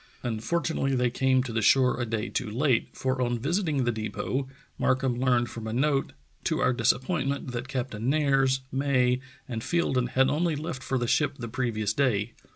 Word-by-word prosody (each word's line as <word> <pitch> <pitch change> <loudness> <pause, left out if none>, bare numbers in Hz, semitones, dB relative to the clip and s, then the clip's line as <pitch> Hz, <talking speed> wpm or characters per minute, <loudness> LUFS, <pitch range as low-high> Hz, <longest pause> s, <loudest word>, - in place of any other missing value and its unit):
Unfortunately 135 +4 -1
they 125 -1 +1
came 130 0 +2
to 120 -3 -6
the 115 - 0
shore 125 +3 +4
a 120 - -2
day 110 0 -2
too 120 - -3
late, 125 +2 +1
for 130 0 -2
on 120 -1 +1
visiting 155 - 0
the 120 - +1
depot 110 +4 -3 0.3
Markham 130 -1 +1
learned 120 -3 +2
from 110 -1 -6
a 110 - -3
note 135 +2 +1 0.3
to - - 0
our - - +3
disappointment 135 +3 0
that 120 +1 -4
Captain 125 -3 -3
Nares, 135 -3 +2
May, 130 -2 +2 0.3
and 115 -3 -4
Fielden 130 -5 +1
had 130 +1 +3
only 165 +1 +1
left 150 -2 -5
for 130 - -1
the 120 - 0
ship 145 +4 +2
the 120 - -5
previous 110 -3 -1
day. 115 -4 +1
130 Hz, 180 wpm, -27 LUFS, 120-135 Hz, 0.3 s, shore